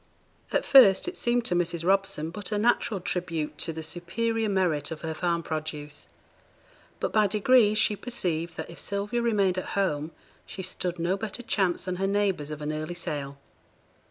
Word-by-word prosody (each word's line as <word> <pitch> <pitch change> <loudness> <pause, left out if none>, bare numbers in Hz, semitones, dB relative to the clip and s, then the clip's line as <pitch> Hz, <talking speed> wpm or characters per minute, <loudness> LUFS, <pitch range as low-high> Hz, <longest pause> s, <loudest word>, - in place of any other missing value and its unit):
At - - +1
first 255 - +7
it 360 - -4
seemed 240 -4 +1
to 180 - 0
Mrs. 170 -1 0
Robson 190 -4 +1
but 205 +4 -6
a 210 - +1
natural 220 -2 +1
tribute 170 -4 -3
to - - -1
the 160 0 -6
superior 220 +7 -2
merit 180 -7 +1
of 160 - -6
her 160 -1 -3
farm 170 +1 -1
produce; 150 -2 -5 0.9
but - - -2
by 215 -1 +4
degrees 215 +1 +4
she 215 0 +4
perceived 175 -8 -2
that - - -6
if 170 - -11
Sylvia 205 +4 -2
remained 200 -6 +2
at 185 - -6
home, 155 -6 0 0.4
she 190 - -6
stood 180 -1 -3
no 175 +3 0
better 220 +3 -5
chance 190 -6 0
than 185 -1 -3
her 195 +1 0
neighbours 195 -7 0
of 150 -1 -6
an 150 - -2
early 155 +3 -4
sale. 140 -5 -4
185 Hz, 180 wpm, -27 LUFS, 165-210 Hz, 0.9 s, first